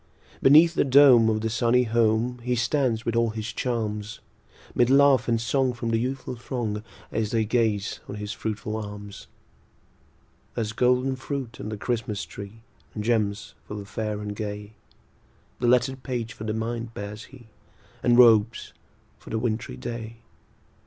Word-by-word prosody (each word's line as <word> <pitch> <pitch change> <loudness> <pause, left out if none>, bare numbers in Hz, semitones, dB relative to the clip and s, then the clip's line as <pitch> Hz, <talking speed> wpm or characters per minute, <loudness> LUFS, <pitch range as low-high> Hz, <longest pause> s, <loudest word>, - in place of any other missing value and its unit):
Beneath 155 +5 +7
the - - +2
dome 130 -4 +7
of 110 -1 0
the 110 - -1
sunny 120 +2 +3
home, 115 +1 +1
He 125 +1 -1
stands 120 -2 0
with 115 - -1
all 115 0 +2
his 110 0 -5
charms; 110 -3 -3 0.5
'Mid 120 0 +3
laugh 135 -2 +5
and 115 -1 +2
song 125 +3 +1
from 120 -1 -3
the 115 - +2
youthful 130 +1 -3
throng, 115 -3 -4 0.3
As 110 -1 -1
they 110 -1 +1
gaze 110 -2 0
on - - -5
his 105 0 -5
fruitful 110 0 -4
arms. 105 -1 -8 1.3
There's 110 -2 -2
golden 125 +3 +2
fruit 130 -3 -5
on - - -5
the 110 - -5
Christmas 110 -4 -2
tree, 100 +6 -10 0.3
And 105 - -3
gems 105 -3 0
for 105 - -6
the 100 -1 -6
fair 105 +1 -4
and 105 0 -5
gay; 105 0 -6 0.9
The 120 - 0
lettered 125 +2 +2
page 120 -3 -4
for 110 - -8
the 110 - -1
mind 115 +1 -4
bears 105 +3 -7
he, 125 -4 -16 0.5
And 120 -1 +3
robes 115 -2 +5 0.5
for - - -13
the 110 - -2
wintry 110 0 -2
day. 115 -1 -6
115 Hz, 160 wpm, -25 LUFS, 110-125 Hz, 1.3 s, Beneath